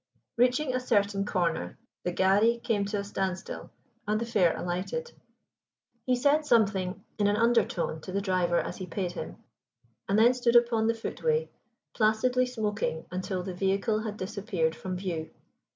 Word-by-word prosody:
Reaching 250 +3 +2
a 255 - +1
certain 200 -5 +1
corner, 170 - -1 0.3
the 180 - -1
gharri 200 +6 +3
came 205 -3 +1
to 205 +1 -2
a 200 - -2
standstill 190 -2 -4 0.4
and 210 +1 +1
the 235 - -2
fare 205 -8 +2
alighted. 185 - -3 1.0
He 255 - +4
said 285 +5 +3
something 200 -7 +1 0.2
in 205 - +3
an 205 - +2
undertone 210 -8 +1
to 185 - -8
the 195 - 0
driver 185 -3 +1
as - - -4
he 185 - -6
paid 180 0 -3
him, 85 - -7 0.7
and 200 - +3
then 235 +3 +6
stood 245 -1 +1
upon 235 -2 +4
the 230 - +2
footway 470 - -1 0.4
placidly 245 +3 +2
smoking 210 -8 -2
until 185 0 -3
the 185 0 -5
vehicle 195 +4 +1
had 215 -1 -5
disappeared 185 -4 -2
from 185 +2 -5
view. 170 -4 -4
205 Hz, 160 wpm, -28 LUFS, 185-235 Hz, 1.0 s, then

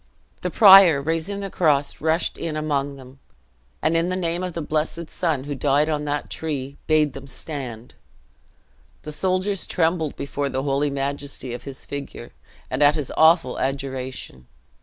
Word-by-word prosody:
The - - -1
prior, 195 - +8
raising 165 +7 -2
the 195 -1 -5
cross, 145 -4 +1
rushed 160 +2 +1
in 155 -2 -4
among 145 -2 -1
them, 130 0 -14 0.6
and, 160 - +2
in 165 +2 +1
the 185 - -1
name 170 -1 -1
of 180 -1 -4
the 165 - -4
blessed 155 +2 -2
Son 160 -7 -1
who 145 +1 -4
died 145 +2 +2
on 150 -1 -1
that 145 0 -2
tree, 140 -3 -4
bade 155 -3 +3
them 135 0 -9
stand! 130 -6 -7 1.1
The 150 - -6
soldiers 185 +4 -1
trembled 165 -3 0
before 140 0 -3
the 130 0 -2
holy 140 +1 +1
majesty 140 -2 -4
of 120 - -8
his 135 -2 -9
figure, 140 0 -7 0.4
and 130 +3 -3
at 145 +1 +6
his 150 -4 -3
awful 160 -5 +4
adjuration. 130 - -4
145 Hz, 160 wpm, -23 LUFS, 140-165 Hz, 1.1 s, prior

